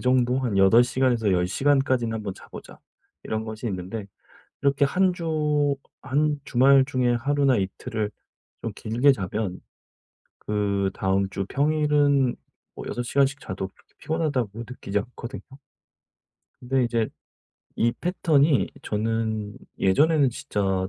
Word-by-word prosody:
정도 125 0 +2
'한 115 -6 -1
8 95 +5 +6
시간에서 120 -4 +1
10 90 -1 +2
시간까지는 130 0 +1
한번 105 -3 -4
자 - - -15
보자.' - - -11 0.4
이런 110 0 -3
것이 110 +1 -6
있는데 100 +2 -5 0.6
이렇게 140 0 +3
1 185 +5 +2
주 150 -4 0 0.3
한 150 +1 0
주말 135 +2 +5
중에 125 -2 +1
하루나 140 +1 +2
이틀을 105 +2 -3 0.5
좀 - - -3
길게 120 +6 +3
자면 100 -3 -3 0.8
그다음 100 -2 0
주 100 -1 -3
평일은 145 -3 +2 0.4
뭐 - - -8
6 120 - -3
시간씩 140 +2 +1
자도 95 0 -5
그렇게 - - -30
피곤하다고 140 -10 -2
느끼지 105 -5 -3
않거든요. 120 +3 -7 1.2
근데 130 0 +1
이제 115 -2 0 0.7
이 115 +1 +2
패턴이 155 -5 +2
저는 110 -1 -2 0.2
예전에는 145 +7 +3
진짜 95 -7 -2
120 Hz, 255 characters per minute, -25 LUFS, 105-140 Hz, 1.2 s, 8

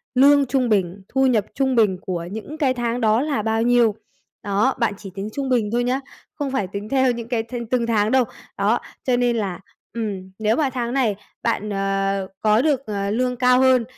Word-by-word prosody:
lương 280 +2 +6
trung 250 -1 0
bình 195 -2 0
thu 265 0 +2
nhập 220 -5 +2
trung 265 -2 +1
bình 210 -5 +3
của 175 -3 -4
những 220 +9 -7
cái 270 -4 +2
tháng 240 0 -2
đó 220 +2 +3
là 290 -6 -1
bao 225 +1 0
nhiêu. 235 -3 +3 0.5
Đó, 205 +6 +2
bạn 230 -3 +1
chỉ 200 -2 -9
tính 200 +2 -4
trung 275 -2 -3
bình 230 -5 +1
thôi 240 +1 +1
nhá, 255 +2 0 0.3
không 285 -3 -3
phải 260 -8 -1
tính 200 +3 -6
theo 260 -1 +3
những 235 -1 -5
cái 235 -2 -1
thìn 235 0 -6
từng 235 0 0
tháng 215 -1 +2
đâu. 260 -1 +4 0.3
Đó, 210 +4 +2 0.2
cho 250 -2 +1
nên 245 -1 +2
là 190 -5 -2 0.3
ừm, 200 -5 -4
nếu 215 +1 +2
mà 280 -1 +1
tháng 245 -1 -3
này 245 -7 +1 0.3
bạn, 210 +1 -1
ờ, 195 -1 -1
có 215 +2 +4
được, 275 -3 +1
ờ, 200 -1 -2
lương 250 +2 0
cao 250 0 +4
hơn 260 -2 +4
235 Hz, 215 wpm, -22 LUFS, 205-255 Hz, 0.5 s, lương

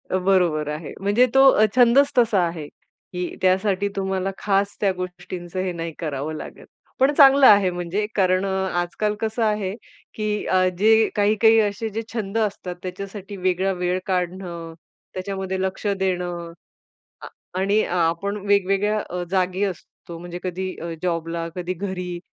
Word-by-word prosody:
अ, 185 - +1
बरोबर 175 -6 +2
आहे. 150 +1 -6
म्हणजे 205 +5 +3
तो 270 0 +8
अ, 215 - +4
छंदच 255 +3 +5
तसा 225 -5 +4
आहे 165 -3 -6 0.5
की 180 0 -4
त्यासाठी 190 +1 +2
तुम्हाला 190 -1 -1
खास 200 0 0
त्या 200 -2 +3
गोष्टींचं 180 0 -6
हे 185 -1 -2
नाही 165 -1 -5
करावं 150 -1 -3
लागत. - - -9 0.3
पण 265 +2 +4
चांगलं 275 -1 +7
आहे, 200 -3 +6
म्हणजे 175 +4 -2
कारण 185 -1 +2
अ, - - -1 0.3
आजकाल 210 +4 -2
कसं 220 +2 -1
आहे 210 -3 0 0.4
की 210 -1 -2
अ, 185 0 +3
जे 220 +1 +5
काही-काही 215 +2 +4
असे 215 +1 -1
जे 220 +2 -4
छंद 220 -2 -3
असतात, 200 -4 -2
त्याच्यासाठी 195 +2 -7
वेगळा 185 +1 0
वेळ 180 0 -1
काढणं, 180 -2 -3 0.4
त्याच्यामध्ये 190 0 -4
लक्ष 190 +2 -3
देणं. 180 -3 -2 0.7
अ, - - -8 0.3
आणि 200 +3 +2 0.2
आपण 170 +5 0
वेगवेगळ्या 200 +1 +2
अ, 180 0 -3
जागी 185 0 0
असतो, 175 -2 -6
म्हणजे 175 0 -7
कधी 185 0 -4
अ, 170 0 -5
जॉबला, 165 -1 -2
कधी 180 0 -3
घरी, 180 -1 -5
190 Hz, 150 wpm, -22 LUFS, 180-205 Hz, 0.7 s, तो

